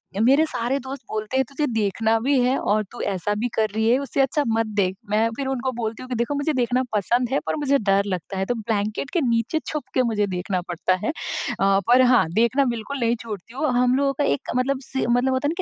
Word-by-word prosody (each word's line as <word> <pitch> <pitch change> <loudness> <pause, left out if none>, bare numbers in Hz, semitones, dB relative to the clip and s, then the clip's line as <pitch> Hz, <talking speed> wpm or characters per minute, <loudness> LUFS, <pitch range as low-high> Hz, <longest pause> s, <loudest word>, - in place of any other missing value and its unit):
य 200 - -2
मेरे 275 +7 +5
सारे 245 -2 -1
दोस्त 265 +1 -7
बोलते 215 +4 -2
हैं, 265 - +4
तुझे 295 +2 -1
देखना 220 +1 +1
भी 270 +3 +2
है 255 +2 +2
और 215 +1 +1
तू 240 - -7
ऐसा 200 +1 -1
भी 245 - 0
कर 220 -1 +2
रही 220 +1 +2
है 245 - +5
उससे 275 0 -1
अच्छा 280 +3 +1
मत 225 0 +1
देख। 190 -2 +1
मैं 220 +2 +2
फिर 270 0 -3
उनको 260 -1 -1
बोलती 230 0 -4
हूँ 255 - -11
कि 250 - -2
देखो 235 +5 -1
मुझे 285 +2 0
देखना 250 0 +1
पसंद 235 +4 +1
है 275 - +2
पर - - -1
मुझे 280 -1 +2
डर 200 -1 +2
लगता 190 0 -4
है, 190 - 0
तो 245 - -1
ब्लैंकेट 215 +3 -2
के 345 - +2
नीचे 235 +5 +1
छुपकर 275 -3 -1
मुझे 215 -4 0
देखना 180 0 -2
पड़ता 175 +2 0
है। - - 0 0.5
अ, 195 0 +4
पर 250 +2 +6
हाँ, 250 -5 +5
देखना 235 +6 +3
बिल्कुल 245 +3 -3
नहीं 235 0 +2
छोड़ती 220 -1 -8
हूँ। 305 - 0
हम 250 +1 +3
लोगों 275 0 +1
का 285 +2 -1
एक 140 - -1
मतलब 260 +2 +1
से 265 +1 -2
मतलब 245 +2 +2
होता 260 +2 0
है - - +1
ना - - -1
240 Hz, 245 wpm, -23 LUFS, 215-265 Hz, 0.5 s, पर